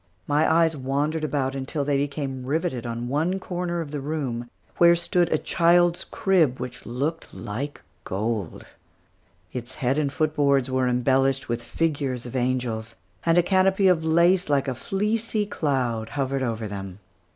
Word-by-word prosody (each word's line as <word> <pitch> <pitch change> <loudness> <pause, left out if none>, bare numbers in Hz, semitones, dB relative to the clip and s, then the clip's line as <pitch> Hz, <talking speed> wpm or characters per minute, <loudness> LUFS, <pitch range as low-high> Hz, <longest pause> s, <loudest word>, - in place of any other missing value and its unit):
My 150 +2 +2
eyes 165 0 +3
wandered 145 +4 -1
about 135 -3 -1
until 140 +2 -3
they 145 0 +1
became 140 -2 -3
riveted 140 -3 -2
on 120 +1 -4
one 160 +8 0
corner 175 -2 -3
of 150 -3 -6
the 150 - -3
room, 135 -5 -3 0.3
where 170 0 +7
stood 175 0 +1
a 155 - +3
child's 175 +2 +3
crib 165 -10 +2
which 125 0 -7
looked 145 +7 -3
like 135 +8 -5 0.2
gold. 105 -2 -3 0.9
Its 125 0 -6
head 135 +1 0
and 145 -2 0
foot 155 +1 0
boards 140 -3 +2
were 130 0 +1
embellished 135 +2 +2
with 120 0 -1
figures 135 -2 -2
of 120 - -7
angels; 120 -3 -1 0.3
and 165 +1 +4
a 175 - +6
canopy 190 +1 +3
of 175 -3 +3
lace 170 +3 +3
like 140 -1 +2
a 130 - 0
fleecy 210 - -1
cloud 125 - -1
hovered 135 +1 -1
over 115 -3 -2
them. 95 -2 -6
140 Hz, 160 wpm, -25 LUFS, 125-165 Hz, 0.9 s, where